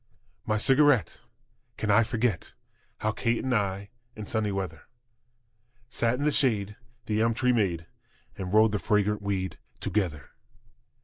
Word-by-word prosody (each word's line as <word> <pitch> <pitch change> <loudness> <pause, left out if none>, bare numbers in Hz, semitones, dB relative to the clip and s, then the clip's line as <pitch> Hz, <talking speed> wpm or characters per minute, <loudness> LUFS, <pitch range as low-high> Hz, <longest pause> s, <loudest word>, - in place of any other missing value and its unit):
My 105 -1 +1
cigarette! 135 - +3 0.6
Can 105 - 0
I 110 +3 +6
forget 115 -4 -1 0.5
How 110 - +1
Kate 115 +1 -1
and 130 - 0
I, 100 -2 -1 0.2
in 110 - -7
sunny 105 0 -1
weather, 90 -6 -5 1.0
Sat 120 -1 +1
in 145 - -2
the 150 - +3
shade 105 -8 +1 0.3
the 110 0 0
elm 115 0 +2
tree 125 +1 +2
made 90 -8 0 0.5
And 95 -1 -5
rolled 110 +1 +5
the 105 - -1
fragrant 105 -1 +1
weed 95 -2 -3 0.2
together? 85 -9 -2
105 Hz, 140 wpm, -27 LUFS, 100-115 Hz, 1.0 s, I